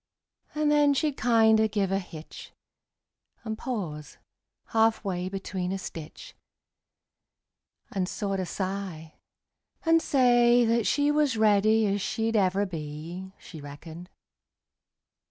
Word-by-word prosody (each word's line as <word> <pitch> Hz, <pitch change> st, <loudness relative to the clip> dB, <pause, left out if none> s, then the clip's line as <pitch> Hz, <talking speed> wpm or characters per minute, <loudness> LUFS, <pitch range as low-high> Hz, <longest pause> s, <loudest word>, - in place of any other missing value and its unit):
And 300 Hz, 0 st, +1 dB
then 290 Hz, -1 st, +4 dB
she'd 295 Hz, 0 st, 0 dB
kinder 220 Hz, -3 st, +4 dB
give 200 Hz, -3 st, -1 dB
a 195 Hz, -, +1 dB
hitch, 165 Hz, -4 st, -10 dB, 0.9 s
And 220 Hz, -1 st, -4 dB
pause 185 Hz, -, -5 dB, 0.5 s
half 225 Hz, 0 st, +2 dB
way 180 Hz, -1 st, -2 dB
between 190 Hz, -1 st, -4 dB
a 195 Hz, -, -2 dB
stitch, 180 Hz, -, -9 dB, 1.6 s
And 185 Hz, -2 st, -2 dB
sorter 195 Hz, -3 st, -2 dB
sigh, 185 Hz, -4 st, -5 dB, 0.7 s
and 330 Hz, 0 st, +4 dB
say 245 Hz, -4 st, +4 dB
that 230 Hz, -1 st, +1 dB
she 290 Hz, 0 st, +2 dB
Was 295 Hz, -5 st, +1 dB
ready 215 Hz, +1 st, +4 dB
as 200 Hz, 0 st, 0 dB
she'd 225 Hz, +2 st, -1 dB
ever 195 Hz, 0 st, +2 dB
be, 165 Hz, +2 st, -7 dB
She 160 Hz, -, -11 dB
reckoned. 160 Hz, +5 st, -10 dB
205 Hz, 115 wpm, -27 LUFS, 180-235 Hz, 1.6 s, then